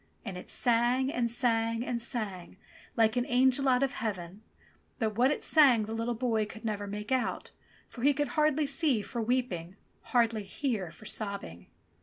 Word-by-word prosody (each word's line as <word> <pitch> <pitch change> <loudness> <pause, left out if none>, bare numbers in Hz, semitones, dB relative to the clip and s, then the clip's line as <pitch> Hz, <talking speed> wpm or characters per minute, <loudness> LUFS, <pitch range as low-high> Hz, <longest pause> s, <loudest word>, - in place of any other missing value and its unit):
And 195 -4 -5
it 180 - -9
sang 245 +3 +2
and 240 -1 0
sang 230 -1 +1
and 240 -2 -2
sang 200 -7 -3 0.4
hke 225 0 +3
an 245 - +1
angel 260 +2 +3
out 250 +1 +3
of 275 - 0
heaven; 195 -3 -5 0.6
but 220 -4 -1
what 250 +4 +4
it 295 - -2
sang 265 -8 +5
the 220 - -6
httle 230 +1 -2
boy 225 -3 0
could 220 +2 -11
never 205 -2 -2
make 210 +2 -6
out, 260 -1 -1 0.4
for 240 - -11
he 285 +3 +5
could 290 +1 -1
hardly 305 -1 +2
see 275 -5 +1
for 235 - -4
weeping, 215 -8 -2 0.3
hardly 230 -3 +2
hear 210 - -3
for 195 +6 -15
sobbing. 200 - -4
230 Hz, 175 wpm, -30 LUFS, 210-255 Hz, 0.6 s, sang